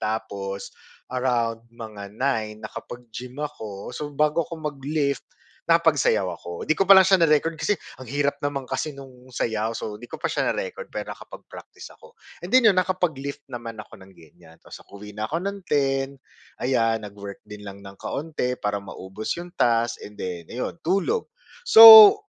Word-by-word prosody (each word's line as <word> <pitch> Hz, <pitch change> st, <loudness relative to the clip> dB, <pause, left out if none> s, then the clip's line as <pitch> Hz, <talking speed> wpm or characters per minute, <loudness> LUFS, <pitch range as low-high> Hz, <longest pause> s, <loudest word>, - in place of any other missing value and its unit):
tapos, 100 Hz, -3 st, -4 dB, 0.4 s
around 120 Hz, -3 st, -1 dB
mga 110 Hz, -4 st, -9 dB
9 110 Hz, -5 st, -1 dB
nakapag-gym 125 Hz, +1 st, -9 dB
ako. 110 Hz, -7 st, -7 dB
So, 150 Hz, +3 st, -5 dB
bago 150 Hz, +3 st, +2 dB
ako 165 Hz, -1 st, -7 dB
mag-lift 145 Hz, 0 st, -2 dB, 0.5 s
nakapagsayaw 155 Hz, -, +3 dB
ako. 85 Hz, +1 st, -8 dB
'Di 155 Hz, -, +2 dB
ko -, -, +1 dB
pa -, -, +10 dB
lang 190 Hz, -1 st, +7 dB
siya 190 Hz, -3 st, +4 dB
na-record 160 Hz, +1 st, +3 dB
kasi 180 Hz, +4 st, -1 dB, 0.2 s
ang 130 Hz, -2 st, -11 dB
hirap 145 Hz, 0 st, 0 dB
naman 140 Hz, -2 st, -3 dB
kasi 155 Hz, -, -3 dB
nung 130 Hz, -2 st, -14 dB
sayaw 110 Hz, -3 st, -2 dB
so, 105 Hz, -, -5 dB
'di 120 Hz, -, -12 dB
ko -, -, -7 dB
pa -, -, -2 dB
siya -, -, 0 dB
na-record 485 Hz, -1 st, -5 dB
pero -, -, -6 dB
nakapag-practice -, -, -13 dB
ako. 475 Hz, -, -19 dB, 0.2 s
And -, -, -7 dB
then 255 Hz, -2 st, +5 dB
iyon 195 Hz, -4 st, +5 dB
nakapag-lift 155 Hz, -7 st, -3 dB
naman 120 Hz, -3 st, -8 dB
ako 105 Hz, -1 st, -11 dB
ng 95 Hz, -, -16 dB
ganyan 85 Hz, 0 st, -19 dB
tapos -, -, -12 dB
uwi 105 Hz, +1 st, -11 dB
na 105 Hz, +1 st, -4 dB
ako 165 Hz, -, -1 dB
ng 200 Hz, 0 st, -3 dB
10 135 Hz, -2 st, +1 dB, 0.5 s
ayan 115 Hz, -3 st, +1 dB
nag-work 100 Hz, 0 st, -9 dB
din 105 Hz, 0 st, -10 dB
lang 100 Hz, -1 st, -9 dB
ng 100 Hz, 0 st, -11 dB
kaunti 140 Hz, -5 st, -3 dB
para 105 Hz, -1 st, -2 dB
maubos 95 Hz, +2 st, -8 dB
yung 175 Hz, 0 st, -9 dB
task 115 Hz, 0 st, +1 dB
and 105 Hz, 0 st, -12 dB
then 90 Hz, -2 st, -5 dB
ayun, 125 Hz, +6 st, -4 dB
tulog. 200 Hz, -, 0 dB, 0.3 s
So, 225 Hz, -, +11 dB
125 Hz, 170 wpm, -24 LUFS, 105-155 Hz, 0.5 s, So